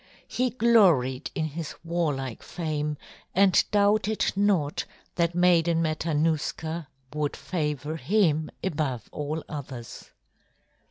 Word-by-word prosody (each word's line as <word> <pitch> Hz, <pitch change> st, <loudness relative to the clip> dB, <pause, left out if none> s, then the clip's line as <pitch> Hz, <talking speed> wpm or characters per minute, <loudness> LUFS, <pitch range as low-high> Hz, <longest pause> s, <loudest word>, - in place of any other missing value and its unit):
He 255 Hz, 0 st, 0 dB
gloried 185 Hz, -, +3 dB
in 160 Hz, -4 st, 0 dB
his 155 Hz, +1 st, -5 dB
warlike 150 Hz, -8 st, -2 dB
fame 150 Hz, -3 st, -3 dB, 0.4 s
and 195 Hz, -1 st, +5 dB
doubted 210 Hz, +1 st, +2 dB
not 195 Hz, -8 st, +1 dB, 0.3 s
that 170 Hz, 0 st, 0 dB
Maiden 170 Hz, -2 st, +4 dB
Matanuska 160 Hz, 0 st, -1 dB, 0.3 s
would 150 Hz, -1 st, -1 dB
favor 150 Hz, -3 st, -3 dB
him 160 Hz, -, +2 dB
above 145 Hz, -, -2 dB
all 150 Hz, +2 st, -3 dB
others. 130 Hz, -5 st, -8 dB
160 Hz, 100 wpm, -27 LUFS, 150-180 Hz, 0.4 s, and